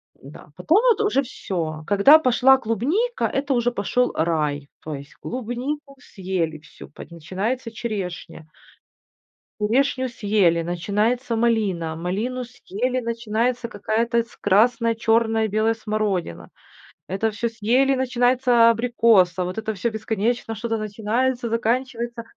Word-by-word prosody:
Да. 140 +3 -14
Потом 320 - +3
вот 440 -1 +3
уже 415 -10 +2
всё. 165 -10 -5
Когда 205 +10 +7
пошла 265 0 +4
клубника, 295 - -1
это 275 0 -1
уже 245 0 +1
пошёл 245 +3 0
рай. 150 -3 -1
То 155 -2 -5
есть 140 +1 -11
клубнику 260 +4 -5
съели 180 -5 -3
всю. 155 - -14
Под 150 - -12
начинается 205 +9 -4
черешня. 190 -8 -6 1.1
Черешню 260 +4 +1
съели, 200 -7 +2
начинается 210 +8 -1
малина. 205 -9 0
Малину 215 +10 -3
съели, 250 +1 -3
начинается 235 +1 -1
какая-то 230 +2 0
с 230 - -20
красная, 230 +3 +3
чёрная, 225 0 +1
белая 215 +2 +1
смородина. 210 - -3 0.6
Это 195 +4 -1
всё 235 +3 -2
съели, 245 +5 +1
начинается 245 -2 +3
абрикос. 230 -5 +3
А 180 - 0
вот 180 +3 -5
это 220 -1 -3
всё 230 +5 -2
бесконечно 220 +1 -2
что-то 225 +1 -3
начинается, 230 +4 -1
заканчивается, 235 +1 -2
225 Hz, 125 wpm, -22 LUFS, 195-245 Hz, 1.1 s, Когда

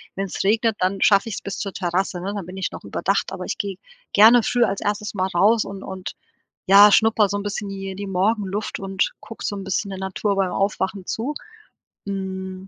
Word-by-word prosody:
Wenn's 195 -1 -3
regnet, 220 +2 +2
dann 190 +1 0
schaffe 200 +2 +4
ich's 210 - -5
bis 200 - -5
zur 195 -2 -4
Terrasse, 180 0 -1
ne, 195 +3 -3
dann 200 -4 -5
bin 180 +2 -9
ich 190 - -2
noch - - -9
überdacht, 185 - -1
aber 185 -1 -5
ich - - -3
gehe 195 -2 -3 0.4
gerne 225 +3 +7
früh 245 +2 +2
als 195 -3 -1
erstes 210 0 -2
Mal 190 -1 0
raus 210 +6 +4
und 195 -1 -8
und 190 -1 -6 0.6
ja 200 +2 +8
schnupper 220 -1 +4
so 205 - -1
'n - - -3
bisschen 205 0 -4
hier 195 -1 -6
die 200 +1 -5
Morgenluft 200 +2 -1
und 195 -1 -1
gucke 225 +1 -10
so 205 - -2
'n 195 - -6
bisschen 195 +1 -2
der 190 - -6
Natur 190 +2 -1
beim 195 -2 0
Aufwachen 195 -1 -1
zu. 250 +7 -2 0.7
Hm 190 -1 -5
195 Hz, 210 wpm, -22 LUFS, 190-210 Hz, 0.7 s, ja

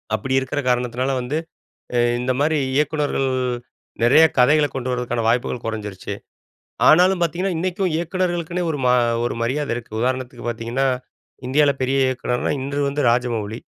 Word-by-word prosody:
அப்பிடி 130 +5 -1
இருக்குற 135 +2 -3
காரணத்துனால 125 +2 0
வந்து, 130 +5 -2 0.6
எ - - +3 0.2
இந்த 130 +1 0
மாதிரி 155 +2 +2 0.2
இயக்குனர்கள் 150 -2 0 0.8
நிறைய 140 +7 +6
கதைகள 145 +4 +5
கொண்டு 130 -1 -3
வரதுக்கான 120 -2 -2
வாய்ப்புகள் 120 +1 0
கொறஞ்சிருச்சு. 105 -4 -5 0.8
ஆனாலும் 180 +3 +5
பாத்தீங்கன்னா, 175 +3 0
இன்னைக்கும் 185 +2 -1
இயக்குனர்களுக்குன்னே 175 0 -2
ஒரு 150 - -2
மா 125 - +5 0.3
ஒரு - - -1
மரியாதை 140 +4 -1
இருக்கு. 120 -3 -9
உதாரணத்துக்கு 130 0 -2
பாத்தீங்கன்னா, 120 +4 -1 0.6
இந்தியால 140 +2 +3
பெரிய 135 +1 +1
இயக்குனர்னா 125 -1 -1
இன்று 140 +1 -3
வந்து 140 +1 -2
ராஜமௌலி. 115 -3 -1
130 Hz, 135 wpm, -21 LUFS, 120-155 Hz, 0.8 s, நிறைய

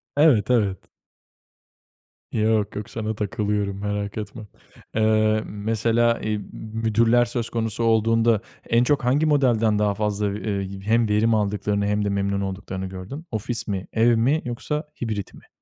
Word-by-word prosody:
Evet, 140 -8 +4
evet. 100 -6 +2 1.5
Yok, 110 -1 +1
yok 105 0 -5
sana 110 -1 -3
takılıyorum 105 -1 -2
merak 105 0 -3
etme. 105 +1 -6 0.5
Eee, 110 0 +3
mesela, 115 +3 +1
i 110 0 -1
mü 105 - -7 0.4
müdürler 115 +2 +4
söz 120 -1 -3
konusu 115 -1 -2
olduğunda 115 0 +3 0.3
en 115 +1 +4
çok 140 0 +1
hangi 140 +5 +3
modelden 120 -8 +3
daha 105 -1 +2
fazla 105 0 -1
v - - -4
ııı, 100 -2 -3
hem 110 +2 +2
verim 110 +2 +3
aldıklarını 105 0 0
hem 105 0 0
de - - 0
memnun 100 0 0
olduklarını 95 -1 -4
gördün? 95 - -7
Ofis 115 +1 -2
mi, 95 -2 -3
ev 115 +1 +4
mi 140 +8 +2
yoksa 145 +5 -3 0.2
hibrit 110 -4 -3
mi? - - -16
110 Hz, 150 wpm, -23 LUFS, 100-115 Hz, 1.5 s, Evet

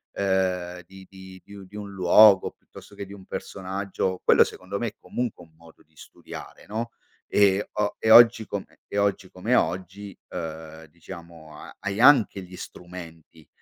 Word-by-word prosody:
uhm, 90 -2 -1
di 95 0 -14
di 95 -1 -13
di 100 - -14
un 100 -1 -11
di 105 - -16
un 105 -1 -7
luogo, 95 +1 +6
piuttosto - - -16
che 100 - -6
di 100 - -12
un 95 -2 -13
personaggio, 95 -1 -4
quello - - +6
secondo 100 +2 -6
me 120 - -1
è 105 - -7
comunque 120 -6 -4
un 80 - -28
modo 80 0 -19
di 80 - -37
studiare, - - -12
no, 115 +3 -4 0.4
e 100 0 +3
o 105 -1 -1
e 110 - -1
oggi 115 -1 +8
come 100 -1 -7
e - - -5
oggi 100 -2 0
come 110 +7 -2
oggi, 95 +1 -2
uhm, 80 -1 -7
diciamo 85 -1 -12
ha - - -12
hai 100 +1 -4
anche 125 -7 +5
gli 90 0 -12
strumenti, 80 -3 -11
95 Hz, 170 wpm, -25 LUFS, 90-100 Hz, 0.4 s, oggi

